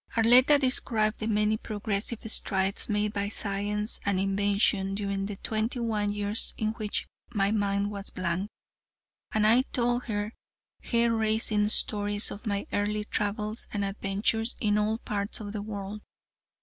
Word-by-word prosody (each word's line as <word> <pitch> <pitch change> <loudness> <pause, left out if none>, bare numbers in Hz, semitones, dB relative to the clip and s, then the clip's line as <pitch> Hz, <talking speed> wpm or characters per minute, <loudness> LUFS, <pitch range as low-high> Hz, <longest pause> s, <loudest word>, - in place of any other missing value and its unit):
Arletta 250 +6 +7
described 230 -5 +1
the 215 - -2
many 210 0 +2
progressive 215 +1 -3
strides 195 -2 0
made 210 0 0
by 200 0 -1
science 210 +1 -1
and 200 -2 +1
invention 195 0 +2
during 200 -1 -2
the 205 - -5
twenty 220 +4 -2
one 215 -3 0
years 205 +1 -3
in 215 - 0
which 215 -2 -3 0.3
my 200 0 +2
mind 200 -1 0
was 200 -1 -3
a - - -22
blank, 185 +2 -2 0.8
and 215 -1 +2
I 230 +4 +6
told 245 -1 0
her 210 -1 -3 0.5
hair 235 -1 +2
raising 220 -1 +1
stories 205 -1 +3
of 210 +3 -8
my 200 -1 -1
early 210 +1 0
travels 210 +1 -2
and 200 -1 -1
adventures 200 +3 -1
in 210 -2 +2
all 215 +1 +1
parts 205 -2 -3
of 205 -2 -6
the 210 - -3
world. 205 0 -6
210 Hz, 150 wpm, -28 LUFS, 200-220 Hz, 0.8 s, Arletta